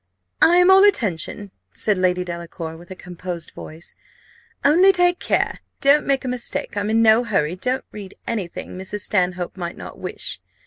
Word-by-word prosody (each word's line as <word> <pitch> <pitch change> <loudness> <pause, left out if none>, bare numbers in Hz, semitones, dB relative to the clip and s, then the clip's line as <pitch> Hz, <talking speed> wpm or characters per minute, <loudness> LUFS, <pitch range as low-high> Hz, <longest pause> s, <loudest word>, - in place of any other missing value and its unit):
"I 345 - +6
am 360 +1 +6
all 385 +1 +7
attention," 205 - 0 0.2
said 210 - 0
Lady 180 -1 +1
Delacour, 170 -2 -7
with 170 +1 -14
a 185 - -8
composed 175 -2 -7
voice; 160 +2 -11 0.7
"only 355 +7 +6
take 355 -1 +2
care, - - 0 0.2
don't 285 +2 +4
make 275 -1 +1
a - - -2
mistake: 250 -3 -3
I'm 205 +1 -1
in 225 +1 +3
no 220 +2 +5
hurry; 180 -8 0
don't 250 +8 -2
read 200 -2 -9
any 215 -6 -2
thing 170 - -8
Mrs. 195 +2 -5
Stanhope 180 -2 -1
might 175 -1 -5
not - - -10
wish. - - -2
205 Hz, 175 wpm, -21 LUFS, 180-260 Hz, 0.7 s, all